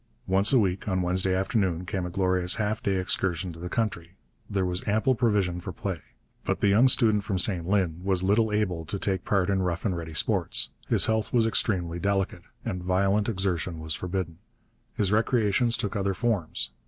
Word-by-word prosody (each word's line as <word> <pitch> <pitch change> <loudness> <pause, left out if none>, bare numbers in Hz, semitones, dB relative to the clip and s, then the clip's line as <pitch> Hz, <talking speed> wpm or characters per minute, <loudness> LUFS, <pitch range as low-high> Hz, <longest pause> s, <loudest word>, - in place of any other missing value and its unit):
Once 95 +2 +3
a 135 - +5
week, 95 -4 0
on 95 -2 0
Wednesday 95 +1 0
afternoon, 95 -2 0
came 90 0 -3
a - - -5
glorious 90 0 +1
half 110 +1 -2
day 100 -2 0
excursion 90 -2 -1
to 80 - -12
the 90 +1 -6
country. 90 -6 -2 0.4
There 95 -2 0
was 90 0 -1
ample 110 +6 +2
provision 105 -7 +1
for 95 - -6
play. 90 0 -5 0.4
But - - -1
the 100 - +3
young 110 +6 +5
student 110 -5 +4
from 95 0 -2
St 90 -3 +2
Lin 90 -4 0
was 95 -1 +1
little 105 +3 +2
able 95 -6 -1
to 100 - -4
take 95 -2 -1
part 95 -3 +1
in 95 -1 +1
rough 90 0 -2
and 95 -4 0
ready 80 -1 -6
sports. - - +2 0.2
His - - +3
health 110 -1 0
was 115 -2 +3
extremely 90 -6 0
delicate, 100 0 -1 0.2
and 90 - -3
violent 95 +4 +1
exertion 90 -4 -2
was 80 0 -2
forbidden. 90 -2 -4 0.6
His 100 -2 +1
recreations 115 +1 +2
took 100 - -3
other 100 -1 -1
forms. 90 - -1
95 Hz, 190 wpm, -26 LUFS, 90-105 Hz, 0.6 s, a